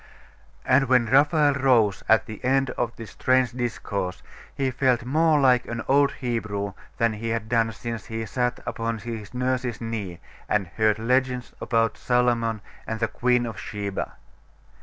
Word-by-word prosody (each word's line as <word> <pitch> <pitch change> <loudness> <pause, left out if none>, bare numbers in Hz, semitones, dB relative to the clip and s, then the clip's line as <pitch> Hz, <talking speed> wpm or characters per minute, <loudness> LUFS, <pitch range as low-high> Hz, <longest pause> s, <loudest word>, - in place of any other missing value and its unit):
And 130 +1 +4
when 125 -2 +4
Raphael 145 +4 +4
rose 125 -7 +3
at 110 +3 +5
the 110 -2 -9
end 135 +1 +2
of 120 -1 -3
this 115 -2 -9
strange 130 -2 +2
discourse, 110 -6 -3 0.3
he 135 -1 0
felt 125 -2 +1
more 155 +3 +3
like 125 -3 +4
an 115 -1 -4
old 140 +1 +4
Hebrew 110 -5 -3 0.2
than 115 -2 +2
he 115 +2 -4
had 115 -1 -2
done 115 -1 +2
since 115 -2 -6
he 115 0 -4
sat 125 +3 -1
upon 115 0 -2
his 110 -2 -7
nurse's 125 -1 -1
knee, 105 -7 -5 0.3
and 105 -2 +2
heard 110 +1 +2
legends 125 +2 0
about 115 -1 +1
Solomon 120 -3 +1 0.3
and 110 0 -3
the 115 - +1
Queen 125 +2 +1
of 115 -3 -6
Sheba. 100 -2 -4
120 Hz, 160 wpm, -25 LUFS, 110-130 Hz, 0.3 s, at